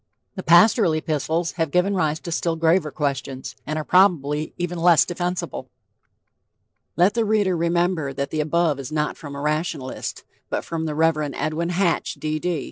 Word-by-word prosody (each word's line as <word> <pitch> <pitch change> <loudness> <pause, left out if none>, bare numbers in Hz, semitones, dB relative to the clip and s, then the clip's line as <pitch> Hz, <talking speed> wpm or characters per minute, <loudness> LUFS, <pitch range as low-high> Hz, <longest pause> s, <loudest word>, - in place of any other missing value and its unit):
The 190 - -6
pastoral 180 +2 +5
epistles...have 160 +1 -1
given 180 +6 +2
rise 160 -4 0
to 170 - -6
still 165 0 0
graver 165 0 +2
questions, 140 -2 -4
and 155 +1 -2
are 155 - -2
probably 155 -5 +2
even 175 0 -3
less 170 -1 +5
defensible." 175 +1 -4 1.3
Let 180 +4 +4
the 230 0 +1
reader 205 -4 +1
remember 170 -3 0
that 140 +1 -4
the 155 - 0
above 155 -1 +1
is 135 +2 -7
not 150 -1 -1
from 145 -3 -9
a - - -6
rationalist, 150 -3 -3 0.3
but - - -2
from 160 -1 -3
the 150 - -3
Rev. 155 -2 +1
Edwin 155 +3 -2
Hatch, 175 -1 0
D. 155 0 -3
D. 175 -1 -1
165 Hz, 165 wpm, -23 LUFS, 150-175 Hz, 1.3 s, pastoral